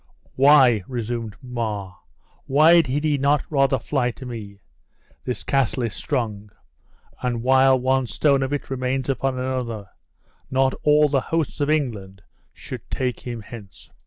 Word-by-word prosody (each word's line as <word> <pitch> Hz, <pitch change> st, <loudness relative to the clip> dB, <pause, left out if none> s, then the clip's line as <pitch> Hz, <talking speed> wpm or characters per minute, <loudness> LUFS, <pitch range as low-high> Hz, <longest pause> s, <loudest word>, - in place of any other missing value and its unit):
"Why," 130 Hz, -6 st, +5 dB
resumed 115 Hz, -3 st, -4 dB
Mar, 110 Hz, -7 st, -4 dB, 0.5 s
"why 160 Hz, +5 st, +6 dB
did 145 Hz, 0 st, -2 dB
he 150 Hz, -2 st, +1 dB
not 140 Hz, +1 st, +2 dB
rather 135 Hz, -2 st, +3 dB
fly 130 Hz, -2 st, -1 dB
to 125 Hz, +2 st, -9 dB
me? 105 Hz, -5 st, -8 dB, 0.6 s
This 125 Hz, -, -4 dB
castle 135 Hz, -2 st, 0 dB
is 115 Hz, -, -2 dB
strong; 110 Hz, -7 st, -3 dB, 0.7 s
and 120 Hz, -2 st, -2 dB
while 130 Hz, +1 st, +5 dB
one 130 Hz, 0 st, +1 dB
stone 140 Hz, +5 st, +2 dB
of 135 Hz, 0 st, -2 dB
it 145 Hz, -2 st, -4 dB
remains 130 Hz, 0 st, -2 dB
upon 135 Hz, -1 st, -1 dB
another, 125 Hz, -6 st, -4 dB, 0.6 s
not 130 Hz, 0 st, +2 dB
all 150 Hz, 0 st, +4 dB
the 140 Hz, -2 st, +1 dB
hosts 160 Hz, 0 st, -2 dB
of 145 Hz, -, +1 dB
England 105 Hz, -11 st, -2 dB, 0.3 s
should -, -, -9 dB
take 125 Hz, -2 st, -2 dB
him 120 Hz, -2 st, -6 dB
hence." 105 Hz, -3 st, -12 dB
130 Hz, 145 wpm, -22 LUFS, 115-135 Hz, 0.7 s, why